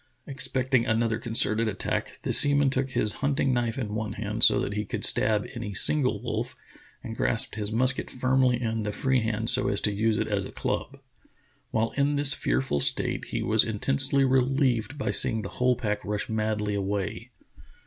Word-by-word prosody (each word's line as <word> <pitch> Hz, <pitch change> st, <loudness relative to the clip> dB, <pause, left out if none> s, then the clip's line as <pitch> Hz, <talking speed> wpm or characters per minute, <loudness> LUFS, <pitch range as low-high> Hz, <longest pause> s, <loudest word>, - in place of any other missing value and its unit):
Expecting 130 Hz, -3 st, -1 dB
another 115 Hz, 0 st, 0 dB
concerted 115 Hz, -1 st, +1 dB
attack, 100 Hz, -3 st, -3 dB
the -, -, 0 dB
sea 145 Hz, 0 st, +6 dB
man 140 Hz, -2 st, +2 dB
took 135 Hz, 0 st, -2 dB
his 105 Hz, -4 st, 0 dB
hunting 140 Hz, -1 st, 0 dB
knife 120 Hz, -1 st, -2 dB
in 110 Hz, -6 st, -4 dB
one 110 Hz, -1 st, -4 dB
hand 105 Hz, +2 st, -3 dB
so -, -, +6 dB
that 100 Hz, -, -3 dB
he 105 Hz, +1 st, -2 dB
could -, -, -3 dB
stab 105 Hz, -1 st, +1 dB
any 115 Hz, -5 st, -6 dB
single 135 Hz, +4 st, +4 dB
wolf, -, -, -4 dB, 0.5 s
and 115 Hz, -, -7 dB
grasped 120 Hz, +2 st, 0 dB
his 105 Hz, -1 st, -4 dB
musket 125 Hz, +3 st, +2 dB
firmly 130 Hz, -1 st, +1 dB
in 115 Hz, -2 st, -3 dB
the 105 Hz, 0 st, -3 dB
free 130 Hz, +4 st, 0 dB
hand 110 Hz, 0 st, -1 dB
so 130 Hz, 0 st, +2 dB
as -, -, +1 dB
to 105 Hz, -, +1 dB
use 110 Hz, +1 st, 0 dB
it -, -, -2 dB
as -, -, -2 dB
a -, -, -12 dB
club. -, -, -4 dB, 0.7 s
While 115 Hz, +1 st, -1 dB
in 145 Hz, +1 st, 0 dB
this 145 Hz, -1 st, +7 dB
fearful 65 Hz, +4 st, -1 dB
state -, -, -1 dB
he -, -, -4 dB
was 110 Hz, 0 st, +3 dB
intensely 135 Hz, +5 st, +2 dB
relieved 130 Hz, -1 st, 0 dB
by 135 Hz, -, -2 dB
seeing 110 Hz, -1 st, 0 dB
the 100 Hz, -, -6 dB
whole 125 Hz, 0 st, 0 dB
pack 105 Hz, -3 st, -3 dB
rush 105 Hz, 0 st, -4 dB
madly 110 Hz, -1 st, -2 dB
away. 100 Hz, -1 st, -4 dB
115 Hz, 190 wpm, -26 LUFS, 105-130 Hz, 0.7 s, this